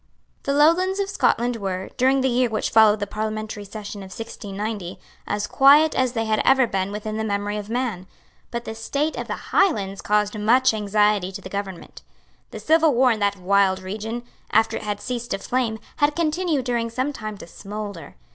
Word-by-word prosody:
The 275 - -1
Lowlands 345 +7 +3
of 395 0 -1
Scotland 240 -9 +1
were, 190 -3 -4
during 265 +2 +3
the 265 - +2
year 250 -1 +2
which 215 - -2
followed 220 -1 +6
the 205 - -1
parliamentary 215 0 -4
session 205 0 -8
of 190 - -8
1690, 205 -3 -6 0.3
as 205 0 -1
quiet 290 +6 +6
as 255 -1 +1
they 225 -2 -1
had 215 -1 +1
ever 265 -1 +5
been 195 -3 -2
within 215 +1 -4
the 220 - -1
memory 205 -1 -2
of 210 0 -6
man; 230 -7 -2 0.4
but 235 0 -5
the 220 - -5
state 280 +8 -2
of - - -5
the - - -6
Highlands 200 - +2
caused 210 0 +1
much 245 +4 +4
anxiety 210 -2 +1
to 190 - -8
the 185 - -9
government. 195 -2 -6 0.5
The - - -8
civil 320 -3 +3
war 255 +1 +5
in 220 - -1
that 200 -1 +1
wild 190 0 +2
region, 215 +5 -5 0.3
after 225 - +3
it - - -6
had 205 -1 -3
ceased 240 0 -4
to - - -1
flame, 235 +1 -1 0.2
had 290 -1 +2
continued 325 -4 0
during 235 -2 -1
some 255 +5 -2
time 215 -4 -6
to - - -10
smoulder. 200 0 -8
220 Hz, 195 wpm, -23 LUFS, 205-255 Hz, 0.5 s, followed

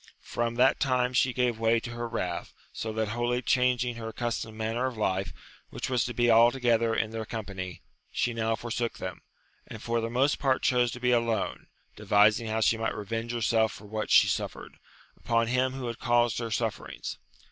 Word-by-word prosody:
From 120 0 -2
that 130 +2 +4
time 125 -2 +1
she 130 0 +3
gave 125 -2 0
way 115 0 +3
to 120 - -7
her 120 0 -4
wrath, 90 -7 -4 0.2
so 110 - -4
that 110 -1 -1
wholly 120 +2 -1
changing 125 -1 +1
her 115 -1 -6
accustomed 110 -1 -4
manner 115 +3 -1
of 125 -3 -6
life, 95 -2 -1 0.4
which - - -5
was 125 -3 +2
to 120 - -4
be 120 0 +3
altogether 115 0 +4
in 110 - 0
their 115 0 -4
company, 100 -5 -6 0.3
she 120 - 0
now 115 0 0
forsook 120 0 -3
them, - - -6 0.5
and 110 - -8
for 115 0 0
the 115 - -2
most 130 +5 +1
part 135 -3 +1
chose 125 -1 +3
to 125 - -7
be 125 0 +2
alone, 115 -2 0 0.3
devising 105 +2 +3
how 110 +1 -1
she 110 - +3
might 115 - -1
revenge 115 +3 -4
herself 115 -1 +1
for 105 - -12
what 110 +1 -4
she - - +7
suffered, - - -4 0.4
upon 115 0 +1
him 130 +2 +1
who 130 -1 -5
had 120 -1 -5
caused 120 -2 +2
her 115 -1 -3
sufferings. 110 0 -3
115 Hz, 190 wpm, -28 LUFS, 110-125 Hz, 0.5 s, she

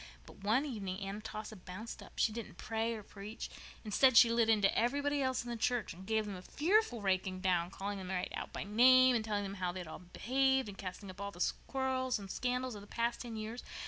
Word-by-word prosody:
But - - -14
one 230 +8 +3
evening 200 -8 -4
Aunt 200 +2 -5
Atossa 215 0 -6
bounced 185 +4 -8
up. - - -13
She - - +2
didn't 225 -4 -6
either - - -23
pray 225 +1 0
or 215 - -7
preach. 205 +3 -8 0.3
Instead, 230 +4 +5
she 235 -1 +9
lit 230 -1 +3
into 205 -3 +4
everybody 285 +4 +1
else 260 -2 0
in 240 - -5
the - - -2
church 235 -1 0
and 185 +3 -12
gave 220 -1 +1
them 205 -2 -5
a 180 - -8
fearful 305 - +1
raking 185 -1 0
down, 175 -2 +2
calling 200 +1 -4
them 185 -1 -7
right 185 -1 -2
out - - -5
by - - -4
name 255 +4 +6
and 225 - +1
telling 210 -2 -1
them 195 0 -4
how 180 -1 +1
they 180 0 -5
all 160 - -8
had 180 -1 -18
behaved, 265 0 +2
and 200 -1 -9
casting 190 +1 -6
up 185 +2 -11
all 200 - -3
the 180 -2 0 0.2
quarrels 260 -2 0
and 195 -2 -8
scandals 250 0 -1
of 205 - -8
the 205 - -13
past 235 +2 -1
ten 235 -2 -6
years. 220 +3 -5
220 Hz, 240 wpm, -34 LUFS, 195-245 Hz, 0.3 s, she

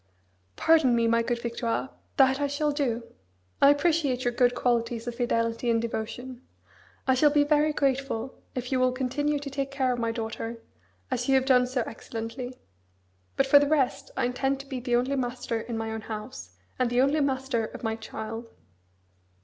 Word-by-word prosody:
"Pardon 315 -7 +4
me, 230 -1 +2
my 230 0 +3
good 235 +1 -1
Victoire, 235 +2 -2 0.3
that 265 +1 +4
I 285 - +2
shall 295 +1 0
do. 255 -5 -1 0.6
I 280 - +8
appreciate 290 -4 +2
your 245 - +1
good 245 0 +3
qualities 235 -2 0
of 240 - -3
fidelity 230 -1 0
and 230 -1 +3
devotion. 235 +2 -5 0.6
I 260 - +4
shall 295 +4 +5
be 290 0 +4
very 300 +1 +3
grateful 270 -3 -1 0.2
if 250 0 -4
you 260 - +2
will 255 0 +3
continue 290 +3 0
to 285 0 -5
take 275 0 -2
care 265 -2 0
of 245 - -4
my 230 -1 0
daughter, 225 0 -4 0.5
as 250 0 -1
you 270 - +5
have 260 0 +3
done 250 -2 +4
so 250 -1 -1
excellently. 230 +3 -6 0.8
But 270 - +4
for 285 +1 +7
the 285 - +2
rest, 275 -2 +1
I 265 - +2
intend 270 +2 0
to - - -14
be 270 -2 -5
the 245 -1 0
only 255 +3 +1
master 245 -3 -2
in 230 0 -5
my 225 0 -3
own 220 0 -4
house, 210 - -8 0.2
and 250 -1 +2
the 245 +1 +1
only 285 +3 +3
master 265 -4 0
of - - -9
my 220 -1 0
child." 225 +1 -6
250 Hz, 190 wpm, -27 LUFS, 230-275 Hz, 0.8 s, I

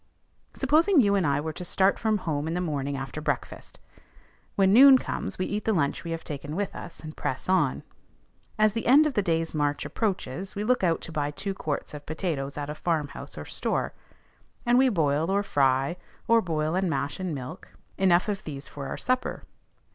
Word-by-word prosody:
Supposing 330 +3 +4
you 205 -5 +4
and 190 -6 +2
I 140 0 +2
were 155 +1 -4
to 180 - -7
start 190 +2 +2
from 220 -1 +1
home 155 -5 -2
in 165 - -2
the - - 0
morning 145 -5 -2
after 135 +3 -5
breakfast; 145 -3 -4 0.8
when 195 -1 +4
noon 265 +3 +9
comes, - - -4
we 185 - -1
eat 210 0 -3
the 220 - +2
lunch 145 -7 0
we 170 - -6
have 165 0 -4
taken 145 +1 -6
with 200 +1 -2
us, 175 - -8
and 155 -1 -8
press 130 - -3
on. 180 -8 +2 0.7
As 215 -1 +4
the 230 - -3
end 285 +5 +7
of 305 - 0
the 210 - +2
day's 165 -3 0
march 145 -1 0
approaches, 190 - -3
we 205 - -2
look 250 -1 +1
out 170 -2 +2
to - - -7
buy 150 -2 -1
two 195 +7 -4
quarts 155 -6 -4
of 145 -1 -9
potatoes 155 -4 -3
at 145 -1 -3
a 150 - -4
farmhouse 155 -2 -3
or - - -6
store; - - -2 0.7
and 240 +1 +4
we 265 0 +5
boil 160 - +1
or 200 +1 +2
fry, 135 -1 +1 0.3
or 230 0 +5
boil 155 -3 -1
and 185 0 +1
mash 140 +1 -2
in 185 -2 -2
milk, 135 +6 -8 0.3
enough 180 -1 +4
of 205 -2 -2
these 140 -2 -6
for 140 -2 -7
our - - -4
supper. 255 0 -1
170 Hz, 205 wpm, -27 LUFS, 145-200 Hz, 0.8 s, noon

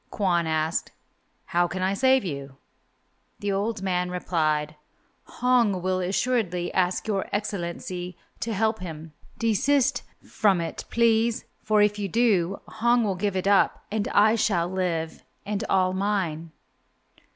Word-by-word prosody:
Kwon 175 -5 0
asked, 160 +2 -1 0.5
"How 175 -1 +1
can 185 +1 -4
I 190 +1 +1
save 260 +2 +3
you?" 140 -4 -6 0.8
The 205 0 -2
old 200 +1 -2
man 180 -1 0
replied, 155 -4 -1 0.5
"Hong 240 -6 +2
will 185 0 0
assuredly 185 -1 -1
ask 180 +3 0
Your 200 -3 -1
Excellency 180 -3 -4 0.2
to 230 - -3
help 220 +1 0
him. 160 -3 -8 0.2
Desist 270 +5 +2 0.3
from 200 -5 +2
it, 165 - -5
please, 230 0 +2 0.2
for 215 -1 +3
if 210 0 +1
you 200 -1 -2
do, 200 -5 +2
Hong 235 +2 +2
will 205 -3 0
give 190 +1 -2
it 185 - -1
up 200 -1 +3
and 210 -1 -1
I 215 +2 +4
shall 210 -7 +1
live 175 -3 -2 0.2
and 205 0 -2
all 185 -1 +2
mine." 185 -5 -1
195 Hz, 140 wpm, -25 LUFS, 175-220 Hz, 0.8 s, I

